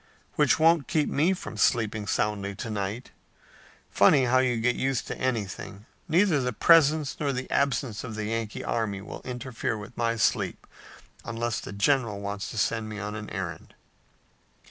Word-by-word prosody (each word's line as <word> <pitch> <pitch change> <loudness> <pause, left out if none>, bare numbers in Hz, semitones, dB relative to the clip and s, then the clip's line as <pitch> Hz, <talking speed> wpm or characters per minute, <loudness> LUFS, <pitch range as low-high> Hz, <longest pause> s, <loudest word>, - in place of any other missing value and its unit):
"Which - - +3
won't 165 -2 +4
keep 155 -3 +1
me 165 +7 +2
from 145 - -7
sleeping 110 -1 +1
soundly 100 -1 -1
to 115 +2 -5
night. 105 +4 -4 0.8
Funny 135 -2 +5
how 130 +1 +4
you 125 -2 +1
get 120 +2 +2
used 135 -2 -1
to - - -5
anything. 105 -4 -3 0.2
Neither 170 -4 +3
the 125 -1 -1
presence 155 +1 +4
nor 145 -2 0
the 130 -1 -4
absence 135 -5 0
of 115 -4 -6
the 110 -1 -3
Yankee 115 0 -3
army 105 -4 -2
will 105 - -8
interfere 125 -3 -4
with 105 +3 -10
my 115 0 0
sleep 110 - 0 0.6
unless 115 0 -2
the - - -8
general 105 0 +1
wants 100 0 -4
to - - -7
send 110 +1 0
me 105 - -6
on 105 0 -4
an 105 0 -6
errand." 95 -4 -6
115 Hz, 165 wpm, -27 LUFS, 105-135 Hz, 0.8 s, Funny